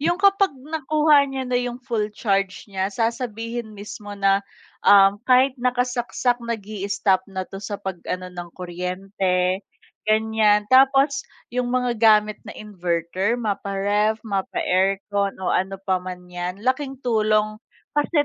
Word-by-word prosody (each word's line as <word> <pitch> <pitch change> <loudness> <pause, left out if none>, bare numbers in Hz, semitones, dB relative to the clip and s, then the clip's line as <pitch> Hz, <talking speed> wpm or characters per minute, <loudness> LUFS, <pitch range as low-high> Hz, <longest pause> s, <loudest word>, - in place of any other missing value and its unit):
'yong 340 +4 +1
kapag 395 0 +4
nakuha 305 0 +2
niya 265 -1 -3
na 250 - -6
yung 245 -1 -3
full 220 -4 -1
charge 195 -4 0
niya 190 -2 -2
sasabihin 230 0 -3
mismo 205 0 -8
na, 195 0 +3 0.4
uhm, 200 +1 +6
kahit 255 +1 +5
nakasaksak 245 0 0
nag-i-istop 205 -4 -1
na 190 -1 -4
'to 195 +1 -9
sa 205 0 -4
pag 190 -3 -6
ano 185 0 -4
ng 175 -1 -7
kuryente, 180 +1 -1 0.5
ganyan. 215 -1 +3
Tapos, 275 +1 +4 0.2
'yong 250 -1 -1
mga 250 -1 +1
gamit 215 -1 +4
na - - -8
inverter, 185 +1 -2
mapa-ref, 205 0 0
mapa-aircon 195 0 0
o - - +1
ano 195 +1 0
pa 190 -1 -1
man 180 0 -8
'yan, 180 +3 -6
laking 265 +1 0
tulong, 215 -2 +1 0.3
kasi 295 0 +2
210 Hz, 130 wpm, -23 LUFS, 195-245 Hz, 0.5 s, uhm